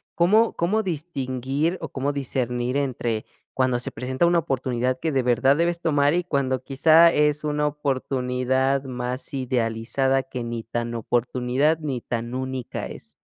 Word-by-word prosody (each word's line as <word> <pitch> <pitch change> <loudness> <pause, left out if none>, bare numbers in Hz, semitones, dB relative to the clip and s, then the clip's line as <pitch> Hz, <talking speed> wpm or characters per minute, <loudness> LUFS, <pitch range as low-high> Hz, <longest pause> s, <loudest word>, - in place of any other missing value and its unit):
¿Cómo 215 +7 +4
cómo 200 +6 +1
distinguir 145 - -2
o 160 - -5
cómo 140 +1 -1
discernir 125 -2 -2
entre 120 -5 -2 0.3
cuando 130 -2 +1
se 125 - -5
presenta 130 +5 -1
una 170 0 +4
oportunidad 130 -3 -1
que 160 - -1
de 135 -3 +1
verdad 125 +3 +3
debes 170 +2 +1
tomar 145 -2 +3
y 180 +1 +1
cuando 135 -6 -1
quizá 160 +5 +6
es 150 -1 +2
una 150 0 0
oportunidad 130 -2 0
más 125 0 -4
idealizada 130 +1 0
que 125 -2 -6
ni 115 -1 -4
tan 120 +1 -3
oportunidad 125 +6 +1
ni 140 -6 -3
tan 120 +1 -4
única 130 -2 -4
es? - - -11
130 Hz, 150 wpm, -24 LUFS, 125-150 Hz, 0.3 s, quizá